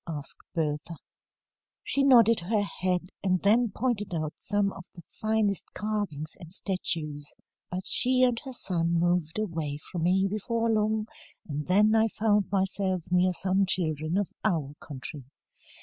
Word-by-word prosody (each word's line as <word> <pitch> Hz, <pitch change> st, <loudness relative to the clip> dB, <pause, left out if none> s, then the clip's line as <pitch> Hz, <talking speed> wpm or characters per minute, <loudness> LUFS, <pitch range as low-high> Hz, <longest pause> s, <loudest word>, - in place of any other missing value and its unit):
asked 150 Hz, -4 st, -6 dB, 0.2 s
Bertha. 155 Hz, +1 st, -2 dB, 0.9 s
"She 280 Hz, -, +3 dB
nodded 230 Hz, -4 st, +6 dB
her 205 Hz, +4 st, 0 dB
head, 185 Hz, -2 st, -2 dB
and 185 Hz, -1 st, +2 dB
then 225 Hz, +4 st, +4 dB
pointed 210 Hz, -4 st, -2 dB
out 155 Hz, -1 st, -3 dB
some 205 Hz, -1 st, -1 dB
of 180 Hz, -, -11 dB
the 170 Hz, -, -12 dB, 0.2 s
finest 215 Hz, -3 st, 0 dB
carvings 205 Hz, -8 st, -3 dB
and 170 Hz, -2 st, -12 dB
statues. 155 Hz, -6 st, -2 dB, 0.4 s
But 185 Hz, +1 st, -4 dB
she 255 Hz, 0 st, +6 dB
and 245 Hz, -2 st, +2 dB
her 265 Hz, -, -9 dB
son 170 Hz, -8 st, -1 dB
moved 175 Hz, -1 st, 0 dB
away 165 Hz, -9 st, -3 dB
from 175 Hz, -, -3 dB
me 185 Hz, +3 st, +2 dB
before 225 Hz, +3 st, -1 dB
long, 215 Hz, 0 st, +1 dB, 0.4 s
and 150 Hz, -1 st, -4 dB
then 210 Hz, +4 st, +4 dB
I 225 Hz, 0 st, +4 dB
found 210 Hz, -2 st, +1 dB
myself 190 Hz, -2 st, 0 dB
near 180 Hz, +1 st, +3 dB
some 190 Hz, +2 st, 0 dB
children 160 Hz, -2 st, +1 dB
of 205 Hz, -2 st, -1 dB
our 160 Hz, -9 st, 0 dB
country. 140 Hz, -1 st, -9 dB
190 Hz, 150 wpm, -27 LUFS, 165-215 Hz, 0.9 s, nodded